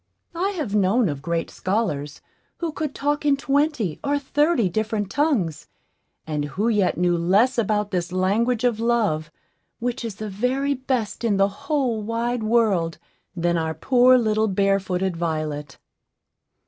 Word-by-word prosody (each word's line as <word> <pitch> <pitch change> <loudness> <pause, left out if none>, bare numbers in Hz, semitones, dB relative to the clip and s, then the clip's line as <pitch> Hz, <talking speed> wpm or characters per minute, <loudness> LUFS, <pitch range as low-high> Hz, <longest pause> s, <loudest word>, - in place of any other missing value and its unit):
I 360 +4 0
have 265 -11 -3
known 210 +2 +3
of 140 -2 -4
great 165 +2 -2
scholars, 170 -8 -2 0.4
who 335 -2 -3
could 305 -2 -4
talk 290 +1 -1
in 285 -1 +3
twenty 275 - 0
or 285 +1 +1
thirty 285 - +1
different 210 +1 -2
tongues, 255 - 0 0.6
and 150 -2 -2
who 200 +10 -1
yet 205 -5 +1
knew 175 0 +2
less 200 +10 +3
about 210 -1 0
this 175 -2 -2
language 215 +6 +1
of 240 -3 +1
Love, 220 -10 +1 0.5
which 245 +1 -3
is 225 -4 -5
the 215 +1 -6
very 250 +8 0
best 255 -5 -2
in 215 -4 +2
the 195 0 +3 0.2
whole 260 -7 +1
wide 230 +2 -2
world, 215 -7 +1 0.4
than 170 -1 +1
our 160 0 -2
poor 255 - +5
little 220 -2 +1
barefooted 190 -2 0
Violet. 155 -4 -3
215 Hz, 150 wpm, -23 LUFS, 180-250 Hz, 0.6 s, poor